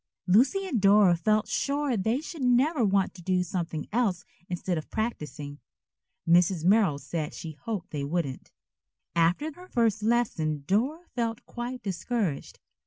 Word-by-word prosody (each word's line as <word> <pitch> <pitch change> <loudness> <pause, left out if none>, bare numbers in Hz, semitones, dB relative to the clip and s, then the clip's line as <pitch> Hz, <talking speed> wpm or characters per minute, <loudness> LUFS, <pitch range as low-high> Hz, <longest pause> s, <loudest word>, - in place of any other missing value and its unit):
Lucy 260 - +3
and 245 - -1
Dora 200 -2 +6
felt 215 +6 +1
sure 285 -2 0
they 225 +7 0
should 315 -1 -8
never 255 +3 +3
want 195 -2 +2
to 180 - -12
do 180 +1 +1
something 165 -3 -4
else 205 -7 +1 0.2
instead 180 0 -2
of 155 - -5
practising. 150 - -4 0.7
Mrs. 175 0 +4
Merrill 195 -6 +4
said 150 +3 -4
she 160 - -6
hoped 200 +4 -6
they 145 -2 -3
wouldn't. 145 -3 -3 0.6
After 175 - +2
her 360 +4 -14
first 225 - +1
lesson 195 -10 0
Dora 265 - 0
felt 230 -1 -2
quite 245 +1 -6
discouraged. 190 - -2
200 Hz, 145 wpm, -27 LUFS, 170-240 Hz, 0.7 s, Dora